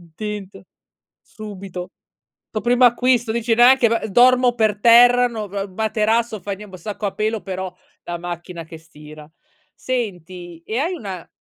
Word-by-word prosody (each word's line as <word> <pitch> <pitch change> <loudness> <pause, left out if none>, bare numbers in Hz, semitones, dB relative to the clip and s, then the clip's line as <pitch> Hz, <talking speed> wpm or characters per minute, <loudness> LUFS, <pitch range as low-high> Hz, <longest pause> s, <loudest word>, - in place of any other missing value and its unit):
Tilt, 205 -3 -6 0.6
subito. 195 -4 -9 0.6
Toh, 215 - -4
primo 245 +1 +4
acquisto, 240 -1 +2
dici: 235 0 0
"Neanche 245 0 +6
ba 225 -1 -1
dormo 245 +3 +4
per 215 -3 +1
terra, 245 +2 +6
no, 220 -4 -6
g 200 +1 -4
materasso, 220 +2 -1
fa 200 +2 -5
nien 210 +1 -10
boh, 185 - -10
sacco 205 +3 -5
a 195 - -5
pelo 215 0 -2
però 190 -1 -5 0.3
la 175 - -5
macchina 175 0 -7
che 160 0 -11
stira" 155 -1 -14 0.5
Senti 180 -8 -5
e 220 - -3
hai 335 +6 -1
una 195 - -7
210 Hz, 150 wpm, -20 LUFS, 185-235 Hz, 0.6 s, Neanche